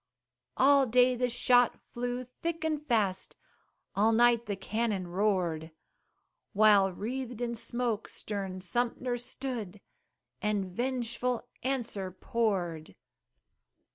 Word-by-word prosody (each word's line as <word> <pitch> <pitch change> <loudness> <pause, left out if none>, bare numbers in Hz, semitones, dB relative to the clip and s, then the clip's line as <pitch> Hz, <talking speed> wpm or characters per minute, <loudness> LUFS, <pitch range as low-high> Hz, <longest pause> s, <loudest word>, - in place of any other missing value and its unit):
All 275 0 +5
day 250 +2 +5
the 250 0 0
shot 245 0 +3
flew 245 +1 -3
thick 330 +6 -5
and 305 -2 -1
fast, 210 -9 0 0.6
All 215 +3 +4
night 235 0 +4
the 205 - -1
cannon 210 -1 -2
roared, 175 -4 0 0.8
While 205 -2 +5
wreathed 245 +5 -5
in 240 -1 -2
smoke 230 -1 -2
stern 195 -3 -4
Sumter 245 +5 -1
stood, 235 -6 -5 0.6
And 210 -2 0
vengeful 245 +3 -2
answer 240 -7 -2
poured. 185 -5 -2
230 Hz, 105 wpm, -30 LUFS, 200-250 Hz, 0.8 s, All